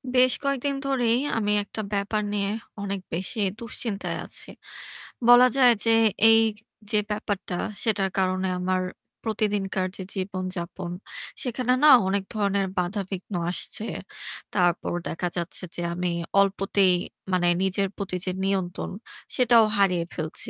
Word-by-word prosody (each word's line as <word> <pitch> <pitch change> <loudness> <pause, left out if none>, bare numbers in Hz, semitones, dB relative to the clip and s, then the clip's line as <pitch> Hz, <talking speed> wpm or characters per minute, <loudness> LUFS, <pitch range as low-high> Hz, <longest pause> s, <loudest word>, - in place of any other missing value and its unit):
বেশ 255 0 +6
কয়েকদিন 275 0 0
ধরেই 245 -3 +2 0.2
আমি 210 -2 +1
একটা 210 +2 -6
ব্যাপার 205 +2 0
নিয়ে 200 -1 0 0.3
অনেক 200 -1 -3
বেশি 185 +7 -2 0.2
দুশ্চিন্তায় 225 -2 -4
আছি। - - -6 0.8
বলা 245 +1 +9
যায় 250 -3 +7
যে 230 - +4 0.4
এই 225 0 +7 0.5
যে 210 - +4
ব্যাপারটা 205 -3 -3 0.3
সেটার 205 -4 +2
কারণে 185 0 +1
আমার 185 0 0 0.4
প্রতিদিনকার 205 -4 -1
যে 190 - -5
জীবনযাপন 185 -2 -4 0.5
সেখানে 250 0 0
না 305 - +9 0.2
অনেক 195 0 0
ধরনের 200 -2 +1
বাধা-বিঘ্ন 190 +1 -4 0.2
আসছে। 210 +4 -4 0.7
তারপর 175 -3 +1 0.2
দেখা 180 +2 -2
যাচ্ছে 175 +2 -3
যে - - -4
আমি 180 0 -1 0.3
অল্পতেই 195 -1 +3 0.4
মানে 180 -1 +2 0.2
নিজের 195 +1 +1
প্রতি 195 -2 -3
যে 185 - 0
নিয়ন্ত্রণ 190 -2 -2 0.4
সেটাও 235 -3 +5
হারিয়ে 180 -4 +2
ফেলছি। 155 -2 -5
200 Hz, 125 wpm, -25 LUFS, 185-220 Hz, 0.8 s, বলা